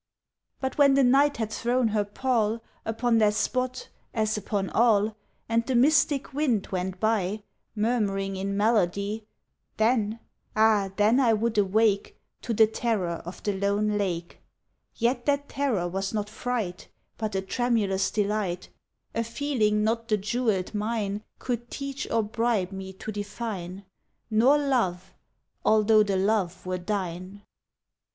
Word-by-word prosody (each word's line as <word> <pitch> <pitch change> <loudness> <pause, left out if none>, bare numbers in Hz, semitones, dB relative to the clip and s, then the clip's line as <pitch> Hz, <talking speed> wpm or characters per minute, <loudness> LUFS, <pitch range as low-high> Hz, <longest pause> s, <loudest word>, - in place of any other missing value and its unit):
But 265 +2 -3
when 280 -1 +6
the 275 - +5
Night 275 +2 +4
had 220 -2 -3
thrown 240 +1 +1
her 210 -1 +1
pall 225 +1 0 0.2
Upon 230 +1 +1
that 210 -1 +3
spot, 255 +2 -1 0.3
as 215 -1 +1
upon 200 -2 -2
all, 215 -2 +3 0.3
And 230 0 +2
the 260 - 0
mystic 280 +2 +3
wind 260 -8 +1
went 185 0 -3
by 215 -1 0 0.3
Murmuring 205 -3 0
in 200 +1 -2
melody 210 0 +1 0.5
Then 220 -1 +1 0.4
ah 215 -2 +4
then 215 +5 +4
I 240 -4 +4
would 225 +1 0
awake 205 +1 +2 0.2
To - - -4
the 220 0 +6
terror 215 -6 -1
of 175 +1 -9
the 205 - 0
lone 200 +2 0
lake 175 -4 -3 0.6
Yet 240 +2 0
that 285 0 +1
terror 245 -11 -1
was 195 +3 -3
not 210 0 -2
fright, 220 -6 -3 0.3
But 215 -3 -3
a 190 - +1
tremulous 200 -3 0
delight 205 -4 -1 0.4
A 230 - 0
feeling 230 -4 0
not 230 +1 0
the 215 -2 +2
jewelled 215 -2 -1
mine 210 -1 -2 0.2
Could 240 -1 -4
teach 275 -1 -5
or 225 -1 +2
bribe 215 -3 0
me 190 0 -6
to 205 +3 -7
define 200 -3 -5 0.5
Nor 245 +7 +5
Love 230 -11 0 0.5
although 215 0 +5
the 200 -2 +1
Love 195 -3 0
were 185 0 -2
thine. 185 +1 -4
215 Hz, 140 wpm, -26 LUFS, 195-235 Hz, 0.6 s, when